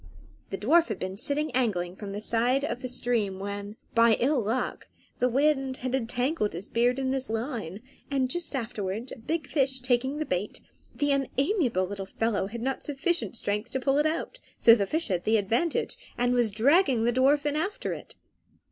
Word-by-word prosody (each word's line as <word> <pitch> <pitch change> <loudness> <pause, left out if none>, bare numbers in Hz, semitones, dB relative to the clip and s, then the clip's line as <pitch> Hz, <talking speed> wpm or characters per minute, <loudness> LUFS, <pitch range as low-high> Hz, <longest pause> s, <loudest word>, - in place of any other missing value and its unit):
The 195 - -3
dwarf 310 - +4
had 215 - -3
been 185 0 -4
sitting 285 +7 -1
angling 195 -8 0
from 200 0 -7
the 205 +1 -5
side 245 +5 +1
of 310 - -4
the 255 - -3
stream 235 -6 0
when, 200 +1 -5 0.2
by 230 -1 +5
ill 270 +1 +2
luck, 225 +4 -2 0.3
the 250 - +3
wind 270 0 +1
had 255 - -1
entangled 250 -1 0
his 175 +5 -6
beard 245 +2 +2
in 265 -1 0
his 265 -2 -2
line, 220 - -4 0.3
and 270 -2 +1
just 340 +2 -1
afterwards 220 -2 -4
a - - -6
big 310 +7 -3
fish 270 -3 +2
taking 255 +2 0
the 310 - -2
bait, 185 -1 -2 0.4
the 290 0 +1
unamiable 275 - +1
little 195 0 -6
fellow 210 -2 -1
had 230 +3 -6
not 270 +1 -1
sufficient 295 -1 -1
strength 210 +3 -2
to 265 - 0
pull 270 +2 +2
it 300 - +3
out; 335 +10 -3 0.2
so 230 - +8
the 200 -4 +2
fish 320 - -1
had 180 -2 0
the 220 +1 +3
advantage, 235 - 0 0.2
and 245 0 +2
was 240 -2 +3
dragging 255 - +3
the 240 +1 +2
dwarf 280 +3 +3
after 390 +11 -2
it. - - -9
245 Hz, 190 wpm, -27 LUFS, 215-275 Hz, 0.4 s, so